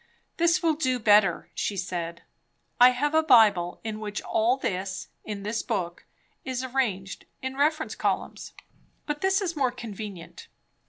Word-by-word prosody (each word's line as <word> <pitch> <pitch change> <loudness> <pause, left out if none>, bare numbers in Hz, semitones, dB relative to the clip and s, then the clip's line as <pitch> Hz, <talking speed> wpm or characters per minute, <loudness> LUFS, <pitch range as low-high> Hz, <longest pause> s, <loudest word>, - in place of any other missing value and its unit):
"This 340 +1 +3
will 325 -1 +3
do 260 -5 0
better," 210 -5 +3
she 200 - -2
said. 170 -2 -4 0.6
"I 245 +1 +9
have 290 +4 -1
a 315 - +5
Bible 215 - +4
in 215 -1 -4
which 210 -1 -4
all 230 +4 +2
this, 190 -6 -3
in 205 -2 -6
this 215 +2 -2
book, 180 -7 -3 0.4
is 255 -1 -3
arranged 235 -8 -2 0.2
in 260 0 -3
reference 310 +3 +1
columns; - - -3 0.5
but 295 0 -3
this 385 +1 +2
is 350 -4 -2
more 270 -4 +2
convenient. 210 -7 -8
230 Hz, 150 wpm, -26 LUFS, 195-280 Hz, 0.6 s, I